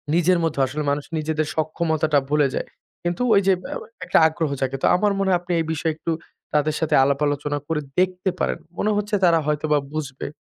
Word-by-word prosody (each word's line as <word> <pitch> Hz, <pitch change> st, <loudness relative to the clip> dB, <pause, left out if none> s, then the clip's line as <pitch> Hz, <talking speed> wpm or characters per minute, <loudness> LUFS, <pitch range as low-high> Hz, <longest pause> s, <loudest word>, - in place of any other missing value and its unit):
নিজের 175 Hz, +1 st, +3 dB
মধ্যেও 145 Hz, -4 st, +1 dB
আসলে 150 Hz, +3 st, -3 dB
মানুষ 145 Hz, 0 st, -2 dB
নিজেদের 155 Hz, 0 st, -1 dB
সক্ষমতাটা 155 Hz, -1 st, +1 dB
ভুলে 150 Hz, -2 st, +3 dB
যায়। -, -, -3 dB, 0.4 s
কিন্তু 175 Hz, +6 st, -2 dB
ওই 200 Hz, -, +5 dB
যে 190 Hz, -, +6 dB, 0.2 s
আ -, -, -5 dB, 0.3 s
একটা 180 Hz, -, +3 dB
আগ্রহ 160 Hz, -1 st, -2 dB
জাগে। 135 Hz, 0 st, -1 dB
তো -, -, +5 dB
আমার 205 Hz, +2 st, +2 dB
মনে 195 Hz, -, +1 dB
হয় 175 Hz, -, +3 dB
আপনি 175 Hz, 0 st, -6 dB
এই 165 Hz, -, 0 dB
বিষয়ে 160 Hz, +1 st, -1 dB
একটু 165 Hz, +1 st, -3 dB, 0.4 s
তাদের 150 Hz, 0 st, +2 dB
সাথে 160 Hz, -, +1 dB
আলাপ 140 Hz, +1 st, +1 dB
আলোচনা 145 Hz, 0 st, -1 dB
করে 160 Hz, -2 st, -1 dB, 0.2 s
দেখতে 185 Hz, 0 st, +1 dB
পারেন। -, -, -1 dB, 0.2 s
মনে 215 Hz, -, +1 dB
হচ্ছে 210 Hz, 0 st, -1 dB
তারা 165 Hz, -1 st, +5 dB
হয়তোবা 150 Hz, 0 st, +1 dB, 0.2 s
বুঝবে। 140 Hz, -4 st, -4 dB
155 Hz, 200 wpm, -23 LUFS, 150-175 Hz, 0.4 s, যে